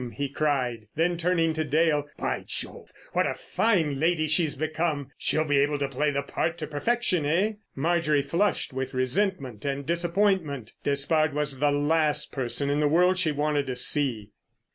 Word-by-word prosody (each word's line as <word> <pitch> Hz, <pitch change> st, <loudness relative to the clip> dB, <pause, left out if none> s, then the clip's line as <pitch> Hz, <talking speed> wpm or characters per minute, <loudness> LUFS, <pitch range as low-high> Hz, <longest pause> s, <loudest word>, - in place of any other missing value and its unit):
he 140 Hz, -1 st, -2 dB
cried; 130 Hz, -6 st, -1 dB
then, 175 Hz, +3 st, +1 dB
turning 165 Hz, -1 st, +1 dB
to 155 Hz, 0 st, -1 dB
Dale: 150 Hz, 0 st, +1 dB
"By -, -, -2 dB
Jove, -, -, -6 dB, 0.2 s
what -, -, +2 dB
a -, -, -2 dB
fine 165 Hz, -11 st, 0 dB
lady 160 Hz, 0 st, +2 dB
she's 155 Hz, 0 st, +1 dB
become! 155 Hz, -2 st, -2 dB
She'll 155 Hz, -, +1 dB
be 145 Hz, -2 st, +2 dB
able 145 Hz, +1 st, +2 dB
to 140 Hz, -1 st, -1 dB
play 140 Hz, +3 st, 0 dB
the 140 Hz, -1 st, -1 dB
part 165 Hz, +4 st, -2 dB
to 160 Hz, -, -4 dB
perfection, 180 Hz, +4 st, 0 dB
eh?" 185 Hz, +8 st, +2 dB, 0.2 s
Marjorie 155 Hz, -1 st, +1 dB
flushed 185 Hz, -4 st, 0 dB
with 130 Hz, 0 st, -4 dB
resentment 130 Hz, -, -1 dB
and 140 Hz, 0 st, -3 dB
disappointment. 170 Hz, -, 0 dB
Despard 145 Hz, +2 st, +1 dB
was 145 Hz, -3 st, -1 dB
the 145 Hz, -, +3 dB
last 150 Hz, +1 st, +1 dB
person 135 Hz, +2 st, -1 dB
in 145 Hz, -, +1 dB
the 150 Hz, -, +3 dB
world 180 Hz, +4 st, +3 dB
she 165 Hz, -4 st, +2 dB
wanted 145 Hz, -1 st, 0 dB
to 130 Hz, -, -3 dB
see. 125 Hz, -5 st, +1 dB
150 Hz, 170 wpm, -26 LUFS, 140-170 Hz, 0.2 s, the